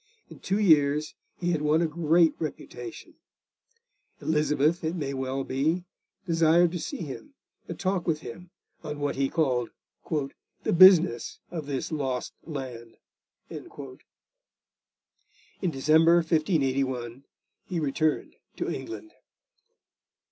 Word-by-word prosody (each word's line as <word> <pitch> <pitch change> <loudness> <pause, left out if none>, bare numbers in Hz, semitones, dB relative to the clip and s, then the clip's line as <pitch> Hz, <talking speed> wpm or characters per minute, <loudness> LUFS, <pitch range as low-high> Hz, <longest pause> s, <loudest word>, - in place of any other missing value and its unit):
In - - -12
two 195 +2 -1
years 150 -5 +3 0.3
he 175 0 0
had 160 -3 0
won 150 +2 +3
a - - +2
great 165 +1 +3
reputation. 320 - -7 1.0
Elizabeth, 150 +1 +1
it 160 +2 -1
may 140 -5 -3
well 130 0 -2
be, 155 +8 0 0.4
desired 165 0 +4
to 175 - -4
see 165 - -5
him, 220 - -9 0.3
and - - -7
talk 185 -2 -1
with 155 -2 0
him 175 +10 -9 0.3
on 150 -1 -5
what 145 -1 -1
he 135 0 0
called 130 -7 0 0.4
'the 145 -4 -3
business 175 -8 +6
of 160 -5 -5
this 140 +1 -3
lost 135 -5 -2
land.' 125 -6 -7 0.5
In - - -8 2.0
December 160 +4 +4
1581 135 -7 0 0.4
he 175 - -2
returned 155 +1 -1 0.2
to - - -2
England. 340 -1 -7
155 Hz, 115 wpm, -27 LUFS, 135-170 Hz, 2.0 s, business